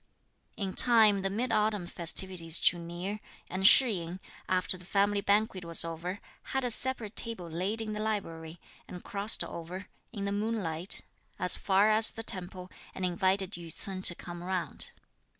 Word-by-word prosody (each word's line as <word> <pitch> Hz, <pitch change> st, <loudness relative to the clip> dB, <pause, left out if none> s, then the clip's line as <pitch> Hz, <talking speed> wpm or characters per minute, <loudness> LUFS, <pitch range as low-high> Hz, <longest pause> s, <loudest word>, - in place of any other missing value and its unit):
In 195 Hz, -3 st, -3 dB
time 220 Hz, -5 st, +5 dB
the 195 Hz, -, -1 dB
mid 230 Hz, +5 st, -2 dB
autumn 210 Hz, -4 st, +1 dB
festivities 170 Hz, -1 st, +3 dB
drew 175 Hz, -, +3 dB
near; 175 Hz, +5 st, -5 dB, 0.3 s
and 190 Hz, +1 st, +4 dB
Shih 255 Hz, +1 st, +7 dB
yin, 170 Hz, +2 st, -7 dB, 0.3 s
after 185 Hz, 0 st, +1 dB
the 180 Hz, -, -12 dB
family 200 Hz, +2 st, +1 dB
banquet 200 Hz, -2 st, +1 dB
was 170 Hz, 0 st, +3 dB
over, 170 Hz, +4 st, -5 dB, 0.4 s
had 265 Hz, -, 0 dB
a 245 Hz, -, 0 dB
separate 230 Hz, -3 st, -2 dB
table 230 Hz, -7 st, 0 dB
laid 185 Hz, +7 st, -3 dB
in 215 Hz, -1 st, -4 dB
the 210 Hz, -, -4 dB
library, 170 Hz, -7 st, -4 dB, 0.3 s
and 180 Hz, -, -9 dB
crossed 205 Hz, +2 st, +1 dB
over, 180 Hz, +4 st, -8 dB, 0.2 s
in 200 Hz, -4 st, -5 dB
the 200 Hz, -, -1 dB
moonlight, 200 Hz, -5 st, -2 dB, 0.4 s
as 180 Hz, -, +2 dB
far 200 Hz, +2 st, +3 dB
as 220 Hz, +1 st, +6 dB
the 225 Hz, -, -7 dB
temple 185 Hz, -2 st, -5 dB, 0.2 s
and 185 Hz, -, -2 dB
invited 185 Hz, +2 st, 0 dB
Yü 170 Hz, -3 st, -8 dB
ts'un 190 Hz, +3 st, -6 dB
to 175 Hz, -, +4 dB
come 175 Hz, 0 st, -9 dB
round. 185 Hz, -1 st, -3 dB
190 Hz, 170 wpm, -30 LUFS, 175-210 Hz, 0.4 s, Shih